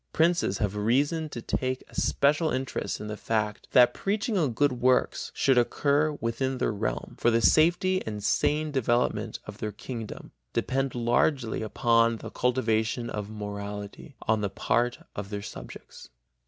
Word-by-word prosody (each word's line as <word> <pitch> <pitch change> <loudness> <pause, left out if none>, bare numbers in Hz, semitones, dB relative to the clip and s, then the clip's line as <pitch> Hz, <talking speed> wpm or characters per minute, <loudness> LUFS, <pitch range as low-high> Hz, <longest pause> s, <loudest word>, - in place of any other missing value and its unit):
Princes 165 - +2
have 105 -1 -1
reason 145 +9 +1
to 120 -5 -7
take 130 0 -2
a - - -20
special 150 +3 +2
interest 130 -1 -3
in - - -6
the 105 0 -4
fact 105 -1 -2
that 125 -1 +6
preaching 210 +3 -1
on 155 -9 +2
good 145 +5 +2
works 130 +1 +2
should 135 -2 +4
occur 145 +5 +2
within 130 +3 -1
their - - 0
realm, 105 +1 -3
for 120 - +3
the 115 0 +3
safety 175 +8 +4
and 105 -2 -4
sane 150 +6 +1
development 125 -3 0
of - - -9
their 105 - -3
kingdom 115 +1 -7 0.2
depend 135 0 -1
largely 120 +1 +1
upon 115 +1 +2
the - - -8
cultivation 120 -1 0
of 105 -1 -4
morality 105 +4 -7
on 110 -1 +1
the 100 - -1
part 120 +5 0 0.2
of 100 -1 -5
their 100 -1 -4
subjects. - - -10
120 Hz, 155 wpm, -27 LUFS, 110-140 Hz, 0.2 s, that